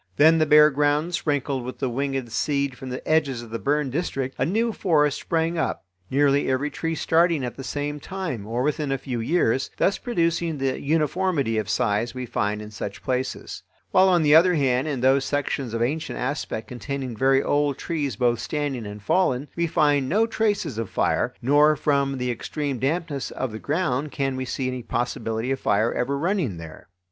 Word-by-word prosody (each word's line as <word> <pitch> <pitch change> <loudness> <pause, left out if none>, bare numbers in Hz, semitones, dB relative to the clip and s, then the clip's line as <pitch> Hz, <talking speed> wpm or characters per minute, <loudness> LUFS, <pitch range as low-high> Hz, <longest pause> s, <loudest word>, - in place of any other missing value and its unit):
Then, 160 +2 +6
the 155 - +3
bare 150 0 +7
ground 145 +4 +1
sprinkled 145 -5 -1
with 125 +1 -6
the 135 - -1
winged 135 -1 -2
seed 140 +2 0
from 130 0 -8
the 125 - -6
edges 140 -6 +1
of 115 - -12
the 115 - -3
burned 145 -1 0
district, 135 -4 -2
a - - +2
new 225 +6 +1
forest 150 -8 +2
sprang 165 0 -1
up, 130 - -2 0.2
nearly 140 +1 +2
every 135 +3 0
tree 165 0 -3
starting 165 -2 +2
at 120 - -5
the 135 - -8
same 145 +2 -3
time 160 - -5
or 120 +3 -1
within 150 0 -1
a 135 - +1
few 125 -2 -4
years, 130 -1 +1
thus 195 - +1
producing 170 - 0
the 135 -1 -1
uniformity 150 -5 +1
of 110 - -4
size 115 +1 0
we 130 0 -4
find 105 -2 -2
in 105 - -10
such 100 -1 -6
places; 130 -1 -3 0.3
while, 190 +1 +5
on 175 -3 +3
the 150 -1 +5
other 175 +3 +6
hand, 135 -1 +1
in 140 -5 -2
those 135 +1 +4
sections 140 -3 -2
of 115 +1 0
ancient 150 +6 -2
aspect 125 -4 -3
containing 130 0 -5
very 135 +3 +3
old 145 -1 +1
trees 145 - -2
both 120 0 +1
standing 145 -7 -3
and 105 0 -9
fallen, 140 - +1
we 170 0 0
find 145 -5 +2
no 215 +6 +3
traces 215 - -1
of 115 - -3
fire, - - +1
nor 145 +4 +5
from 140 -2 +1
the 125 -1 -1
extreme 140 +2 -3
dampness 145 0 -1
of 130 -3 -4
the 110 - -6
ground 150 -2 -1
can 135 -1 -1
we 130 0 -3
see 130 +1 -2
any 130 -1 -3
possibility 115 0 -2
of 135 - -1
fire 110 +3 +1
ever 140 +3 -1
running 165 - -1
there. 80 -1 -10
140 Hz, 195 wpm, -24 LUFS, 125-155 Hz, 0.3 s, bare